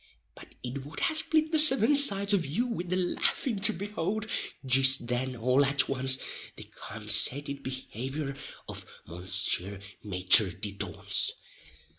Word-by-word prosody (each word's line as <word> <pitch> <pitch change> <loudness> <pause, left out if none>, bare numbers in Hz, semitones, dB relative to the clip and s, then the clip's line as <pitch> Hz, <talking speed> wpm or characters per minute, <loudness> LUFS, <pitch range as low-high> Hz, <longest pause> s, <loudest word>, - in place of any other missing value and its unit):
But - - -17
it 130 +2 -7
would 145 +3 -9
ha 325 - 0
split 315 0 0
the 315 - +4
seven 290 -3 +6
sides 200 -8 +4
of 190 -4 +1
you 165 - -3
wid 200 -8 -6
the 185 - -1
laffin' 190 +5 -2
to 195 - +6
behould, 205 +3 -5 0.4
jist 130 -1 +4
then 125 +2 -4
all 125 +4 +1
at 140 0 0
once, 130 -1 +2 0.4
the - - -9
consated 125 +7 0
behavior 135 +2 -6 0.3
of - - -8 0.2
Mounseer 90 +2 -3 0.2
Maiter 95 -1 +3
di 105 -2 -6
dauns. 100 - -3
135 Hz, 140 wpm, -27 LUFS, 120-200 Hz, 0.4 s, seven